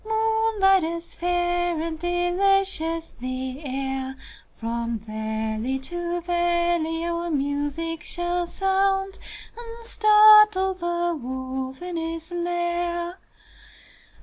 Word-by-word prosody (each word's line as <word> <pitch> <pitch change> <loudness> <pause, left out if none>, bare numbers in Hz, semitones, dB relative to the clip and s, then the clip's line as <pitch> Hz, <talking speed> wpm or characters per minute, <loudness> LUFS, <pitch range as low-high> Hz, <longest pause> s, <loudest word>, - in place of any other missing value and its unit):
Moonlight 440 -3 +2
is 335 +1 -4
fair 350 -1 0
and 320 0 -3
delicious 350 -1 +1
the 255 +2 -4
air; 265 -1 -3 0.4
From 230 0 -3
valley 220 +3 -3
to 345 +5 -4
valley 345 -1 0
our 340 0 -2
music 290 +2 -2
shall 350 +2 -2
sound, 385 +1 0 0.4
And 465 0 -10
startle 425 -3 +6
the 345 -1 -1
wolf 260 +2 -5
in 360 -1 -4
his 330 +1 -4
lair. 345 0 -2
345 Hz, 95 wpm, -24 LUFS, 285-365 Hz, 0.4 s, startle